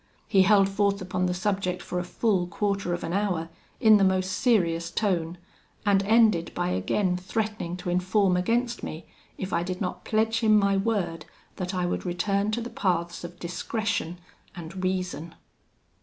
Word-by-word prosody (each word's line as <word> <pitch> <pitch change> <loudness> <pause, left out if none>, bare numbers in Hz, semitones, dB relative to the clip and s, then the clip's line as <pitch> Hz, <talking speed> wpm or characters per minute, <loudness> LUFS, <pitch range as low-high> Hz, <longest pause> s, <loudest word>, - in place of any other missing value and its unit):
He 195 - +4
held 195 0 +5
forth 200 0 +1
upon 185 -1 -1
the 180 - 0
subject 190 -1 -1
for 180 - -3
a - - -2
full 185 -1 0
quarter 200 0 -1
of 175 - -7
an 165 - -3
hour, 185 -5 -1 0.3
in 220 -3 +7
the 200 - +3
most 190 0 +2
serious 170 -6 +1
tone, 175 -5 -1 0.5
and 200 -1 +4
ended 215 -5 +3
by - - 0
again 180 - 0
threatening 210 -2 -3
to 180 - -5
inform 185 +1 +2
against 235 +6 0
me, 160 - -6 0.3
if 190 0 -5
I 170 - +2
did 180 +1 -4
not 185 - -4
pledge 225 +1 +1
him 215 -2 +5
my 200 -1 +3
word 195 -6 -1 0.3
that 185 +1 -3
I 180 -1 0
would 175 - -2
return 195 +3 0
to 235 - -1
the 235 - -6
paths 175 -3 -1
of 175 0 -8
discretion 180 +1 -2 0.4
and 175 +2 -7
reason. 180 -3 -2
185 Hz, 170 wpm, -26 LUFS, 175-205 Hz, 0.5 s, in